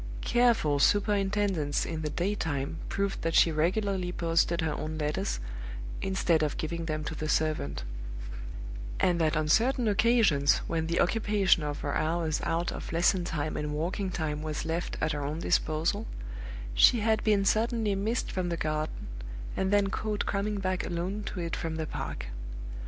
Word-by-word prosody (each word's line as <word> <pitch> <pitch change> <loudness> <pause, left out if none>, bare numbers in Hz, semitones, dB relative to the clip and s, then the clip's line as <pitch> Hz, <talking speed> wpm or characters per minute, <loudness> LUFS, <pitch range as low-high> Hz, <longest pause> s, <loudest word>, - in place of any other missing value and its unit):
Careful 235 -12 +3
superintendence 200 -5 +2
in 160 -1 -3
the 155 - -2
day 180 +6 0
time 145 -5 -2
proved 200 0 -1
that 165 0 -1
she 165 - +6
regularly 185 +3 0
posted 170 0 +1
her 160 -1 0
own 155 +1 -4
letters, 150 - -1 0.6
instead 190 -4 +2
of 150 -2 0
giving 170 +1 -3
them 155 -1 -2
to 150 - -4
the 155 0 -4
servant; 150 - 0 1.2
and 175 -2 +3
that 155 -1 +2
on 155 0 +1
certain 240 - +3
occasions, 205 - +4
when 160 -1 -1
the 170 +1 0
occupation 205 -3 +3
of 150 -1 -3
her 145 - -2
hours 160 0 0
out 170 +1 0
of - - -6
lesson 175 +2 +3
time 155 -3 -2
and 150 0 -2
walking 185 +5 -1
time 155 -4 -2
was 155 0 -3
left 165 +2 -2
at 155 - +1
her 145 -2 -2
own 145 +2 -2
disposal, 165 +4 +1 0.7
she 225 - +6
had 220 0 +2
been 205 -2 +3
suddenly 220 0 +2
missed 215 +5 -1
from 185 -2 -1
the 170 - -1
garden, 155 0 -2 0.5
and 190 - 0
then 200 -1 +3
caught 210 0 -1
coming 205 +1 -1
back 185 -1 -1
alone 180 +4 -2
to 195 - -5
it 170 -1 -2
from 165 -1 -3
the 160 -1 -2
park. - - -5
170 Hz, 170 wpm, -29 LUFS, 155-200 Hz, 1.2 s, she